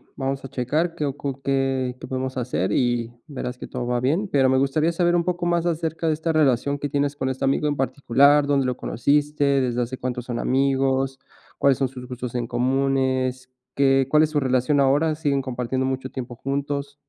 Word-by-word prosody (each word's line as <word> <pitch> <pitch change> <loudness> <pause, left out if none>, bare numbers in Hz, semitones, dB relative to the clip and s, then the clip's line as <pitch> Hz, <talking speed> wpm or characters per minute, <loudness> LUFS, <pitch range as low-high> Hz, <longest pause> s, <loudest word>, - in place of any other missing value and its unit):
vamos 135 0 -3
a 135 - -7
checar 150 +7 -1
qué 150 - -2
ocu 140 -1 -4
qué 135 -2 0
qué - - -7
podemos 130 0 -3
hacer, 110 -6 -1
y 120 -1 0
verás 125 -3 -5
que - - -7
todo 125 -1 -4
va 120 0 0
bien. 160 +11 0
Pero 135 -2 +3
me 130 - +3
gustaría 150 +5 +2
saber 175 0 +2
un 170 - +2
poco 175 -1 -2
más 170 0 +1
acerca 165 0 -2
de 155 - +3
esta 160 +1 -2
relación 140 -2 +2
que 145 - -3
tienes 145 0 0
con 130 -2 -2
este 130 +1 -2
amigo 140 +2 +1
en 145 - 0
particular, 140 +2 +3
¿dónde 140 -2 +2
lo 125 - -1
conociste, 145 +3 0 0.2
desde 125 -1 0
hace 125 +2 -5
cuántos 125 -1 -4
son 120 -2 -3
amigos, 135 0 +1 0.4
cuáles 140 -2 +4
son 135 -2 0
sus 125 -1 -10
gustos 125 -1 -6
en 120 -1 -2
comunes, 130 +1 0 0.3
qué 135 -1 +3
cuál 155 +1 +5
es 155 - 0
su 150 - +1
relación 130 +2 +1
ahora, 145 +4 +3
siguen 145 -3 0
compartiendo 130 0 -2
mucho 130 0 -3
tiempo 125 -2 -6
juntos? 140 +2 -3
135 Hz, 205 wpm, -23 LUFS, 130-145 Hz, 0.4 s, cuál